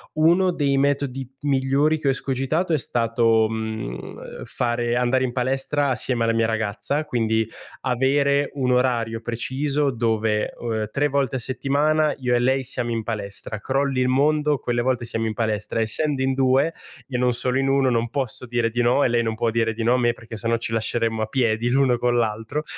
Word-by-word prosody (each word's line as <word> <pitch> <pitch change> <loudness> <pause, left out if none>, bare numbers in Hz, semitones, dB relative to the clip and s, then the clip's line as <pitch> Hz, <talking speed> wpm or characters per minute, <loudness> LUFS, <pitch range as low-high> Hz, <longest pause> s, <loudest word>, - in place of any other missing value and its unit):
Uno 175 +4 +4
dei 140 -4 +1
metodi 135 -1 0 0.2
migliori 140 +2 +2
che 150 -2 -3
ho - - +5
escogitato 135 +6 -1
è - - +4
stato, 115 -2 +2
mhmm, 110 - -6
fare 120 0 -1
andare 125 +1 +2
in 125 - -1
palestra 135 +3 0
assieme 125 -1 0
alla 115 - +2
mia 115 0 +2
ragazza, 115 +7 -1
quindi 110 -4 0 0.3
avere 140 +3 +2
un 130 -2 0
orario 115 -3 0
preciso 135 +4 -1
dove, 110 -2 0
uhm, 110 -3 -3
3 145 +4 +1
volte 135 -2 0
a - - -4
settimana 145 +5 +1
io 125 -2 0
e - - +3
lei 130 +2 +1
siamo 120 -1 -3
in 115 -1 -1
palestra, 105 -1 -5
crolli 135 -1 0
il 125 - +2
mondo 150 +2 +2
quelle 120 -1 -1
volte 125 -1 0
siamo 115 0 -2
in 110 - -1
palestra 110 -1 -2
essendo 135 +5 0
in 130 0 +1
2 135 +4 +2 0.3
e 125 -3 -3
non 125 0 +2
solo 125 +2 -1
in 135 - +1
1 135 -1 +3
non 115 0 0
posso 130 -2 -3
dire 115 -1 0
di 120 +1 0
no 125 +4 +3
e - - +4
lei 120 0 +2
non 110 -1 -2
può 115 0 0
dire 115 0 +1
di 110 +1 -4
no 120 +2 +3
a - - +3
me 120 -1 +2
perché 115 -1 -10
se 110 +1 -4
no 115 0 +2
ci 115 - -4
lasceremmo 115 0 -1
a 110 - -1
piedi 115 -1 0
l'uno 125 -2 +2
con 120 0 +1
l'altro, 115 +6 -1
125 Hz, 200 wpm, -23 LUFS, 115-135 Hz, 0.3 s, ho